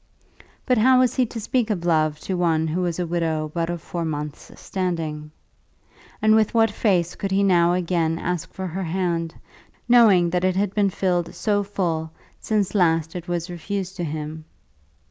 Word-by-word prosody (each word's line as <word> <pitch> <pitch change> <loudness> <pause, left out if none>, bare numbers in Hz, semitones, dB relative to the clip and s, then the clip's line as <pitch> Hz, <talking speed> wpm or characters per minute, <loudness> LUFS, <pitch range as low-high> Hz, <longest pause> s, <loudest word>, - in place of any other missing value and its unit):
But 250 -3 +2
how 255 +3 +5
was 255 -2 +3
he 255 -2 +1
to 225 - -6
speak 230 +1 0
of 180 -5 -2
love 155 -3 +2
to 190 - -3
one 165 -3 +1
who 160 +3 -1
was 175 -2 -1
a 180 - -1
widow 160 -2 -1
but 170 -1 -1
of 175 -2 -4
four 170 -1 -4
months' 150 -2 -5
standing? 165 -5 -3 0.9
And 215 0 +5
with 220 +1 +2
what 225 -1 +4
face 180 -5 +1
could 195 - -4
he 195 +1 +2
now 175 -3 +4
again 170 -2 0
ask 175 -1 -3
for 190 - -6
her 185 +2 -4
hand, 170 -1 -2 0.5
knowing 210 -8 +5
that 180 0 0
it 185 -1 +2
had 200 0 0
been 205 -2 +2
filled 180 -2 -1
so 205 -2 +1
full 175 -6 -2 0.3
since 210 -3 -1
last 165 -4 +2
it 175 0 -6
was 175 -1 -2
refused 190 +1 -5
to 175 - -3
him? 155 0 -5
175 Hz, 185 wpm, -23 LUFS, 165-200 Hz, 0.9 s, how